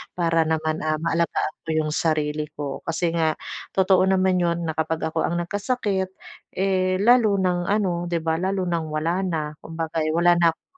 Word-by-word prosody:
para 165 Hz, -2 st, +2 dB
naman, 160 Hz, 0 st, 0 dB
ah, 155 Hz, 0 st, +1 dB
ma-alagaan 165 Hz, -1 st, 0 dB
ko -, -, -8 dB
'yong 155 Hz, -1 st, 0 dB
sarili 150 Hz, -1 st, 0 dB
ko. 145 Hz, -2 st, -5 dB
Kasi 165 Hz, +1 st, 0 dB
nga 160 Hz, -2 st, +1 dB, 0.4 s
totoo 190 Hz, -1 st, +4 dB
naman 190 Hz, -1 st, +3 dB
'yon 170 Hz, -1 st, 0 dB
na -, -, +1 dB
kapag 160 Hz, 0 st, -1 dB
ako 160 Hz, -, 0 dB
ang 170 Hz, -, -1 dB
nag-kasakit, 200 Hz, 0 st, -2 dB, 0.4 s
eh, 185 Hz, -1 st, +1 dB
lalo 225 Hz, -2 st, +5 dB
ng 180 Hz, -2 st, 0 dB
ano 185 Hz, -4 st, 0 dB
'di 170 Hz, -1 st, -1 dB
ba, 160 Hz, 0 st, 0 dB
lalo 190 Hz, +1 st, -1 dB
ng 170 Hz, -2 st, -1 dB
wala 155 Hz, +4 st, -1 dB
na, 155 Hz, -4 st, -2 dB
kumbaga, 165 Hz, 0 st, -4 dB
eh, 155 Hz, -, 0 dB
wala 175 Hz, +1 st, +4 dB
na 170 Hz, -1 st, +4 dB
akong -, -, -38 dB
170 Hz, 185 wpm, -23 LUFS, 160-185 Hz, 0.4 s, lalo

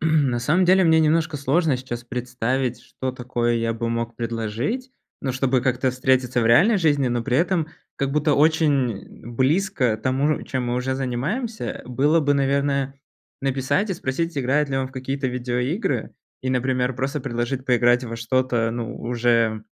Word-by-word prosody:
на 150 Hz, -6 st, +2 dB
самом 160 Hz, +10 st, +2 dB
деле, 185 Hz, +1 st, +5 dB
мне 160 Hz, -1 st, +5 dB
немножко 160 Hz, 0 st, +2 dB
сложно 140 Hz, +1 st, +1 dB
сейчас 120 Hz, -2 st, -6 dB
представить, 125 Hz, +1 st, -2 dB
что 130 Hz, -1 st, -5 dB
такое 120 Hz, -2 st, -1 dB
я 115 Hz, 0 st, 0 dB
бы 115 Hz, +1 st, -3 dB
мог 115 Hz, 0 st, -3 dB
предложить. 115 Hz, -, -3 dB, 0.3 s
Ну, 130 Hz, -2 st, -2 dB
чтобы 130 Hz, 0 st, +1 dB
как-то 130 Hz, +1 st, +1 dB
встретиться 130 Hz, -1 st, +1 dB
в 115 Hz, -, +1 dB
реальной 190 Hz, -, +5 dB
жизни, 145 Hz, -6 st, +2 dB
но 120 Hz, -1 st, -1 dB
при 130 Hz, -2 st, +1 dB
этом 170 Hz, -1 st, +1 dB, 0.3 s
как 140 Hz, 0 st, -1 dB
будто 150 Hz, -1 st, +2 dB
очень 145 Hz, -9 st, +1 dB
близко 130 Hz, -, +1 dB
тому, 135 Hz, +6 st, 0 dB
чем 130 Hz, -2 st, -3 dB
мы 120 Hz, -, -1 dB
уже 130 Hz, +1 st, -1 dB
занимаемся, 150 Hz, -, -3 dB
э, -, -, -5 dB
было 145 Hz, +6 st, +2 dB
бы, 145 Hz, -1 st, +2 dB
наверное, 140 Hz, 0 st, 0 dB, 0.5 s
написать 135 Hz, +10 st, 0 dB
и -, -, 0 dB
спросить, 165 Hz, +4 st, -3 dB
играет 140 Hz, +3 st, +1 dB
ли 135 Hz, -, -2 dB
он 130 Hz, -1 st, 0 dB
в -, -, -18 dB
какие-то 135 Hz, +1 st, -3 dB
видеоигры. 125 Hz, -, -2 dB, 0.3 s
И, 130 Hz, -, -1 dB
например, 125 Hz, 0 st, 0 dB
просто 135 Hz, +4 st, -2 dB
предложить 125 Hz, +1 st, -3 dB
поиграть 120 Hz, 0 st, +3 dB
во 115 Hz, -1 st, -5 dB
что-то, 120 Hz, -1 st, 0 dB
ну, 115 Hz, -1 st, -4 dB
уже, 115 Hz, -2 st, +1 dB
130 Hz, 165 wpm, -23 LUFS, 120-145 Hz, 0.5 s, деле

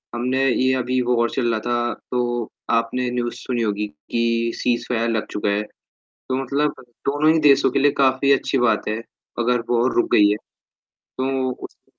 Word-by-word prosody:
हमने 130 Hz, +3 st, 0 dB
ये 130 Hz, +1 st, +2 dB
अभी 125 Hz, +1 st, 0 dB
वॉर 120 Hz, -1 st, +2 dB
चल 120 Hz, -3 st, 0 dB
रहा 110 Hz, -, 0 dB
था, 120 Hz, 0 st, 0 dB, 0.2 s
तो 120 Hz, -2 st, -1 dB, 0.2 s
आपने 120 Hz, +2 st, 0 dB
न्यूज़ 120 Hz, -1 st, -2 dB
सुनी 120 Hz, -2 st, -3 dB
होगी 105 Hz, -1 st, -1 dB, 0.2 s
कि 115 Hz, 0 st, +1 dB
सीज़फायर 120 Hz, -1 st, 0 dB
लग 110 Hz, -2 st, -1 dB
चुका 105 Hz, 0 st, -1 dB
है। 100 Hz, +1 st, +1 dB, 0.7 s
तो 130 Hz, -, 0 dB
मतलब 145 Hz, +2 st, 0 dB, 0.3 s
दोनों 145 Hz, +3 st, +3 dB
ही 160 Hz, -, +2 dB
देशों 140 Hz, -, +5 dB
के -, -, 0 dB
लिए 145 Hz, +1 st, +4 dB
काफ़ी 135 Hz, +1 st, +3 dB
अच्छी 135 Hz, 0 st, +1 dB
बात 120 Hz, -3 st, +1 dB
है, 110 Hz, +1 st, -1 dB, 0.4 s
अगर 120 Hz, 0 st, +2 dB
वॉर 120 Hz, +1 st, +2 dB
रुक 120 Hz, -, +2 dB
गयी 105 Hz, 0 st, +6 dB
है। 105 Hz, -, +1 dB, 0.6 s
तो 130 Hz, 0 st, -3 dB
उसमे -, -, -11 dB
120 Hz, 175 wpm, -21 LUFS, 115-130 Hz, 0.7 s, गयी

